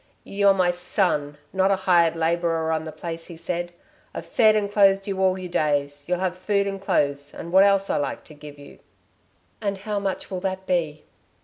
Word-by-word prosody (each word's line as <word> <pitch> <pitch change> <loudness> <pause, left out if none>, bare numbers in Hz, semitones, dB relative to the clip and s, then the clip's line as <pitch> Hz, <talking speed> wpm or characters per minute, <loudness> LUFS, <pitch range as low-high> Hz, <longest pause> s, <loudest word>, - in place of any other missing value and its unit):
"You're 200 0 +3
my 180 -2 +3
son 175 -5 -1 0.2
not 190 0 +2
a 195 - +3
hired 175 -3 +3
labourer 165 0 0
on 160 0 -1
the 155 - -6
place," 165 0 -6
he 170 - -10
said. 175 +1 -4 0.4
"I've - - -5
fed 215 -2 +4
and 205 -1 0
clothed 195 -1 +4
you 195 -1 -2
all 190 0 +3
your 180 -2 -7
days. 145 -2 -1
You'll 180 0 0
have 185 0 -2
food 200 +2 0
and 195 -1 -4
clothes 145 -5 -1
and 170 - -7
what 190 +2 +7
else 195 -1 +3
I - - 0
like 145 - -3
to 155 - -15
give 145 -1 -12
you." 145 0 -14 0.8
"And 200 -2 -2
how 205 +1 -3
much 195 0 -4
will 185 - -3
that 190 0 -4
be?" 160 -5 -1
180 Hz, 205 wpm, -24 LUFS, 160-195 Hz, 0.8 s, what